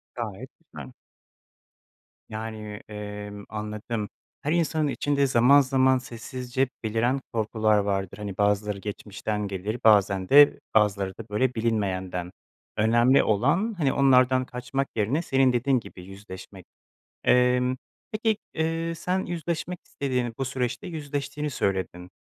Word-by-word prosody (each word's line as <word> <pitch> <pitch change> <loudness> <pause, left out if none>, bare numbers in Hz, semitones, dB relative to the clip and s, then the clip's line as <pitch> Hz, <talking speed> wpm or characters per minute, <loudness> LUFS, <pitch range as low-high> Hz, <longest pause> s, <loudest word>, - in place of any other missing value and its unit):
Gayet - - -5
güzel. - - -11 1.4
Yani, 110 -1 -6
emm, 105 -1 -7
anladım. 105 0 -4 0.3
Her 150 - -1
insanın 160 -2 +1
içinde 140 0 +1
zaman 130 +3 +6
zaman 130 0 +3
sessizce 125 +1 -3
beliren 120 +5 0
korkular 110 -1 +2
vardır. 100 -1 -1
Hani 100 -2 -6
bazıları 105 0 +1
geçmişten 105 +1 -4
gelir, 100 +4 -4
bazen 100 -3 +4
de 145 +1 +7 0.2
bazıları 100 -3 +2
da 115 - -8
böyle 120 +4 0
bilinmeyenden. 95 -5 -1 0.5
Önemli 120 +5 +4
olan, 145 - +2
hani, 140 -5 +1
onlardan 130 -1 +4
kaçmak 125 +2 -3
yerine 115 +9 +1
senin 135 -5 +3
dediğin 125 +2 +2
gibi 95 -5 -12
yüzleşmek. 95 -1 -11 0.6
Emm, 125 0 +3 0.4
peki, 220 0 +1 0.2
eee, 165 +1 -1
sen 185 +3 -1
yüzleşmek 170 +1 -3
istediğini, 125 -4 -2
bu 135 - -1
süreçte 125 0 -3
yüzleştiğini 145 -2 -4
söyledin. 95 -6 -2
120 Hz, 120 wpm, -26 LUFS, 105-135 Hz, 1.4 s, de